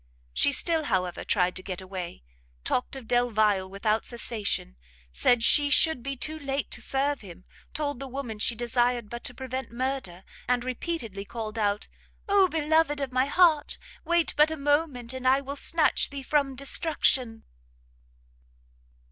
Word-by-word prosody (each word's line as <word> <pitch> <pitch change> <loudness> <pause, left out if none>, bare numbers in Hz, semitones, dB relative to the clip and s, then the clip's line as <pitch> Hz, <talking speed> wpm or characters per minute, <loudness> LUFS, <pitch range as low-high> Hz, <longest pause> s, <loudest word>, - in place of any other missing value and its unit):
She - - +4
still, 320 +2 +2
however, 180 -6 -1
tried 180 -2 +1
to - - -6
get 185 -1 -5
away; 185 - -7 0.4
talked 250 - -1
of 260 -4 -9
Delvile 215 -6 +2
without 215 +3 0
cessation, 220 - -2 0.4
said 230 - +3
she 290 +4 +5
should 320 -2 +4
be 275 +2 -4
too 310 +5 -3
late 275 -1 -3
to 240 - -3
serve 275 +4 0
him, 185 -3 -12 0.3
told 285 -4 -2
the 275 - -5
woman 255 -5 -6
she 230 - +1
desired 240 -1 0
but 240 0 -6
to 250 - -2
prevent 260 -1 -5
murder, 240 -8 -3 0.2
and 245 -1 +1
repeatedly 250 - -4
called 220 +1 -6
out, 205 -1 0 0.4
"Oh 400 -1 +5
beloved 315 -1 +2
of 270 -2 -4
my 255 +1 +3
heart! 315 -1 +3 0.3
wait 345 -2 +1
but 300 +1 +5
a 315 - -4
moment, 285 -4 0
and 260 0 -3
I 265 +1 +5
will 275 0 -6
snatch 310 +1 +2
thee 280 -1 -7
from 280 -1 +1
destruction!" 265 -4 +1
255 Hz, 155 wpm, -27 LUFS, 220-285 Hz, 0.4 s, she